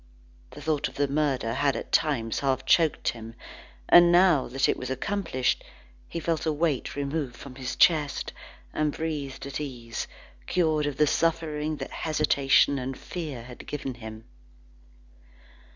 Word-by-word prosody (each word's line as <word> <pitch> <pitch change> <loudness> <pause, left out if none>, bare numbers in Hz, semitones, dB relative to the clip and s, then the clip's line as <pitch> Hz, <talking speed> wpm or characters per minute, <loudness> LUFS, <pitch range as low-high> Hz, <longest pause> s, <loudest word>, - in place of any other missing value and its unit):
The - - -11
thought 155 -2 0
of - - -13
the 145 0 +1
murder 135 -5 0
had 140 0 +1
at - - -6
times 115 -7 +1
half 135 -2 0
choked 165 -3 +3
him, 115 -1 -7 0.5
but - - +9
now 175 -4 +5
that 135 +2 +1
it - - +2
was 130 - -6
accomplished, 130 -2 -1 0.5
he 170 - -4
felt 165 -1 -1
a - - +3
weight 150 -3 -1
removed 140 -2 -2
from 135 +1 -10
his 130 -1 -5
chest, 150 -5 +3 0.4
and 155 -1 +1
breathed 145 -4 -4
at 140 +1 -4
ease, 120 -5 -5 0.4
cured 155 -4 +2
of 140 -2 -3
the 150 - +5
suffering 155 -1 0
that 135 -2 -6
hesitation 140 -3 +3
and 130 0 -4
fear 150 -9 -6
had 125 0 -11
given 135 -3 -4
him. 110 -2 -9
145 Hz, 150 wpm, -27 LUFS, 130-155 Hz, 0.5 s, but